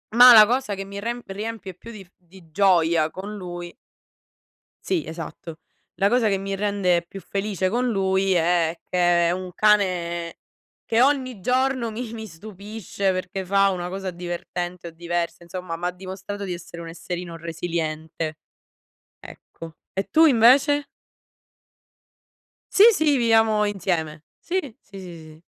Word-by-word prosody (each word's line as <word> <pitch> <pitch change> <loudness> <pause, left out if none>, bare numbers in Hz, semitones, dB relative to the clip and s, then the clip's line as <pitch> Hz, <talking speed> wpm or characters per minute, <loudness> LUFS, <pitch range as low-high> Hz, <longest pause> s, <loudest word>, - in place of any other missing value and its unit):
ma 245 +1 +10
la 215 -1 +10
cosa 245 -3 0
che 195 0 -6
mi 200 +1 -7
remp 235 -1 -5
riempie 205 -2 -6
più 230 +5 -12
di 210 -3 -10
f - - -29
di 175 -1 -19
gioia 170 -4 +3
con 205 +3 -7
lui 175 -2 -7 1.1
Sì, 360 -4 0
esatto. 165 0 -8 0.3
La 200 +1 +2
cosa 240 -3 +3
che 195 - +1
mi 195 0 -4
rende 195 -4 0
più 195 - -9
felice 195 -1 -2
con 245 +2 0
lui, 190 -2 +1
è 170 -1 +1
che 175 -1 +3
è - - +2
un 185 0 -4
cane 180 -5 +1 0.5
che 230 +1 +1
ogni 255 -5 +1
giorno 255 0 0
mi 230 +1 -6
mi 220 -1 -7
stupisce, 200 +2 -5
perché 185 0 -4
fa 195 +1 +3
una 180 -1 -3
cosa 190 0 -4
divertente 175 0 -5
o - - -9
diversa, 170 +1 -3
insomma, 170 -1 -6
mi 175 - -3
ha - - +1
dimostrato 190 +2 -7
di 185 - -4
essere 170 -1 -8
un 165 - -8
esserino 170 0 -6
resiliente. 160 -1 -4 0.8
Ecco. 165 -1 -12 0.2
E 195 - -2
tu 320 +1 +5
invece? 280 +3 +5 1.9
Sì, 395 - +7
sì, 310 -6 +2
viviamo 225 -3 +3
insieme. 165 -6 -2 0.2
Sì, 370 +2 -2 0.2
sì, 195 0 -12
sì, 180 -3 -9 0.2
sì. 160 - -21
190 Hz, 150 wpm, -23 LUFS, 175-215 Hz, 1.9 s, ma